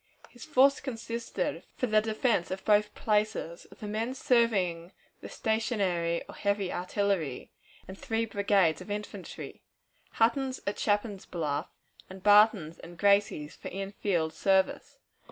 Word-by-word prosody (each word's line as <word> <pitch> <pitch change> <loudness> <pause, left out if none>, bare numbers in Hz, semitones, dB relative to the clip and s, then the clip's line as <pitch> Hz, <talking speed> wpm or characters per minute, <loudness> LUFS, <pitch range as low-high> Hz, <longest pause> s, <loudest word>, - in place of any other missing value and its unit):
His 245 - -11
force 275 +2 +4
consisted, 235 -3 -4
for - - -1
the 215 -2 +3
defense 220 -3 0
of 190 +1 -5
both 210 0 +3
places, 210 -6 -1
of - - -18
the 210 - -5
men 225 +5 -2
serving 195 -10 +1 0.3
the - - -9
stationary 195 -7 0
or - - -10
heavy 200 -2 -1
artillery, 180 -6 -2 0.4
and 190 - -8
three 225 +3 -2
brigades 200 -5 +2
of 185 - -10
infantry 205 -2 -7 0.5
Hunton's 260 +3 +1
at 200 - -2
Chapin's 205 -1 -1
Bluff, 155 -1 -2 0.4
and 190 0 -11
Barton's 205 -6 +5
and 170 0 -12
Gracie's 200 -6 +2
for - - -8 0.3
field 165 -6 0
service. 190 -1 +1
205 Hz, 135 wpm, -29 LUFS, 180-225 Hz, 0.5 s, Barton's